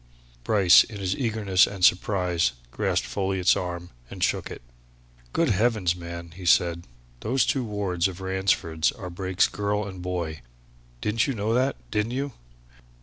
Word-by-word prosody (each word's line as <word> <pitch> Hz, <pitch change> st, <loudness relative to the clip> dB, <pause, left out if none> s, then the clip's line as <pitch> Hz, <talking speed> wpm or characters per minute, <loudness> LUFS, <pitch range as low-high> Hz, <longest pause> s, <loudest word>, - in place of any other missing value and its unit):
Bryce 95 Hz, -, +6 dB
in 105 Hz, -, -9 dB
his 95 Hz, -1 st, -1 dB
eagerness 110 Hz, -6 st, +2 dB
and 95 Hz, -3 st, +1 dB
surprise 90 Hz, -3 st, +2 dB, 0.2 s
grasped -, -, 0 dB
Folliot's 95 Hz, -2 st, +1 dB
arm 90 Hz, -1 st, -5 dB, 0.2 s
and -, -, -5 dB
shook -, -, 0 dB
it. -, -, -9 dB, 0.7 s
"Good 165 Hz, -, +1 dB
heavens, 105 Hz, -4 st, +2 dB
man!" 85 Hz, -1 st, -8 dB
he 90 Hz, +3 st, -11 dB
said. 85 Hz, 0 st, +2 dB, 0.3 s
"Those 125 Hz, -, +1 dB
two 135 Hz, -, 0 dB
wards 100 Hz, -5 st, -1 dB
of 95 Hz, -1 st, -8 dB
Ransford's 95 Hz, -4 st, 0 dB
are 90 Hz, -, -8 dB
Brake's 95 Hz, +1 st, +1 dB
girl 105 Hz, 0 st, -2 dB
and 95 Hz, -2 st, -8 dB
boy! 85 Hz, -5 st, -4 dB, 0.6 s
Didn't 110 Hz, +1 st, +1 dB
you 135 Hz, -, -2 dB
know 110 Hz, +1 st, -1 dB
that, 130 Hz, +3 st, +1 dB, 0.2 s
didn't 110 Hz, +2 st, -1 dB
you?" 135 Hz, +1 st, -3 dB
95 Hz, 150 wpm, -25 LUFS, 90-105 Hz, 0.7 s, Bryce